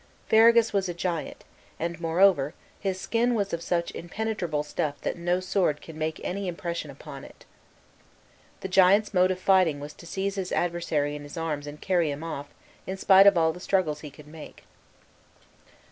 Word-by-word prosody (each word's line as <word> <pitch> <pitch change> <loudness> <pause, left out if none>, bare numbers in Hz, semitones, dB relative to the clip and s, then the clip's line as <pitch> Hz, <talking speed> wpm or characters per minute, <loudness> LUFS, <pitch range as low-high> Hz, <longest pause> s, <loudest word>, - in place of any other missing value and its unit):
Ferragus 230 +1 +5
was 195 -2 0
a 175 - -4
giant, 170 -2 -4 0.4
and 170 0 -4
moreover 165 -3 +3 0.2
his 190 -2 -2
skin 240 +4 +1
was 200 -4 -1
of 170 - -2
such 170 -1 -1
impenetrable 175 -4 -3
stuff 150 0 -3
that - - -2
no 175 +1 0
sword 185 -5 0
could 160 - -11
make 155 0 -3
any 195 +1 -3
impression 170 -3 -4
upon 140 0 -10
it. - - -15 1.2
The - - -4
giant's 195 +3 +4
mode 185 0 +4
of 185 - -1
fighting 185 -6 +3
was 145 +1 -8
to 170 - -14
seize 195 +2 -3
his 185 -1 -3
adversary 165 -4 -1
in 150 - -7
his 145 +3 -10
arms 150 -3 -3
and 145 +1 -8
carry 175 -4 +1
him 145 +2 -5
off, 145 -3 -5 0.4
in 190 - -4
spite 195 +1 +6
of 200 -3 +6
all 160 -1 +3
the 180 - -10
struggles 180 -5 0
he 150 - -8
could 145 +1 -15
make. 155 +1 -12
175 Hz, 180 wpm, -26 LUFS, 155-190 Hz, 1.2 s, spite